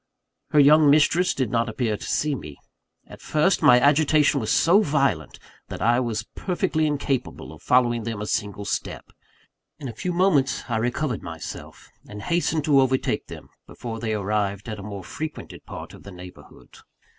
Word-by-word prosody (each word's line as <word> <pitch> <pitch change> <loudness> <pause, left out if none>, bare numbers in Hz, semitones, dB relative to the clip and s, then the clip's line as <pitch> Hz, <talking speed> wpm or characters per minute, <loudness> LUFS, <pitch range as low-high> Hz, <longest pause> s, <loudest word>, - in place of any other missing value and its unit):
Her 150 - +3
young 150 +1 +6
mistress 155 +5 +3
did 130 -5 -1
not 115 0 0
appear 110 -1 -1
to - - -10
see 150 -1 0
me. 75 - -7 0.5
At - - -14
first, 155 +5 +1
my 125 0 +7
agitation 145 +1 +3
was 110 - -4
so 185 +6 +4
violent 140 - 0 0.3
that - - -7
I 120 +2 +3
was 115 -4 -2
perfectly 175 -4 -1
incapable 140 - -3
of 80 - -15
following 120 -2 +2
them 110 -1 -5
a 105 - -4
single 100 -1 -3
step. - - -4 0.7
In 140 - -7
a 120 - -6
few 180 +11 -4
moments 170 -7 +2
I 115 -3 -1
recovered 125 +2 -2
myself; 80 -1 -9 0.2
and 105 -1 -8
hastened 165 0 0
to 145 -2 +4
overtake 130 0 0
them, - - -11 0.2
before 115 -2 -7
they 110 -1 -2
arrived 100 -1 -2
at 110 -2 -5
a - - -7
more 100 -1 -7
frequented 155 - -7
part - - -9
of - - -13
the 100 - -11
neighbourhood. 90 0 -14
125 Hz, 175 wpm, -24 LUFS, 105-150 Hz, 0.7 s, my